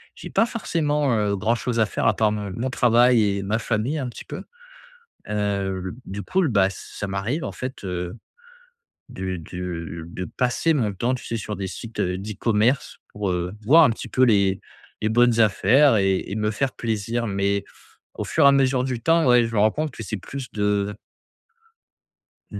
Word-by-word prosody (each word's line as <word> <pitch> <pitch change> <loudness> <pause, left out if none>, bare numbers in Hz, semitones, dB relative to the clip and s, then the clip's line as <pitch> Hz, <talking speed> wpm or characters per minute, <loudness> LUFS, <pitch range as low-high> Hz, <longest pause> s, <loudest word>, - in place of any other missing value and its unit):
j'ai - - -9
pas 225 - +3
forcément, 150 - 0
heu, 105 -1 +1
grand-chose 115 +3 -1
à 110 - +3
faire - - -3
à 110 - +3
part 110 - +3
m 105 -2 -4
mon 130 +3 -2
travail 120 -1 +4
et - - -3
ma 105 +3 0
famille 115 +7 -1
un 130 -4 -3
petit - - -10
peu. - - -7 0.8
Heu 100 -3 -1
l 95 - -3
du 100 +2 -5
coup 190 - 0
l - - +2
bah, 100 -4 +4
ça 100 +1 -7
m'arrive 105 +11 -2
en - - -5
fait, 130 -4 -6
heu, 90 +2 -4 0.9
de 95 -1 -4
de 85 -1 -6
de 90 +2 -5
passer 125 - 0
mon 110 -8 0
temps 120 +7 -1
tu 125 - -7
sais 115 - -2
sur 105 -1 -4
des 95 -1 -4
sites, 110 +5 -7
heu, 90 0 0
d'e-commerce 110 +5 0 0.2
pour, 105 -2 -2
heu, 90 +1 -2
voir 160 +9 +7
un 130 - +4
petit 115 - -5
peu 130 - +1
les 100 -5 +4 0.4
les 110 - +2
bonnes 120 0 +4
affaires 115 +5 +5
et 95 -1 +2
et - - -2
me 105 0 0
faire 130 +4 -1
plaisir. 115 +1 -2
Mais 100 0 0 0.5
au - - -4
fur 155 - +2
et - - +10
à - - +6
mesure 130 -2 +2
du 125 -3 -3
temps, 165 -2 +3
ouais, 125 -1 +6
je 115 - -6
me 105 - +2
rends 110 +1 +5
compte 155 +3 -2
que 115 - -8
c'est 110 +1 -4
plus 135 +6 -7
de 105 -1 0 1.6
mmh, - - -5
110 Hz, 200 wpm, -23 LUFS, 100-125 Hz, 1.6 s, et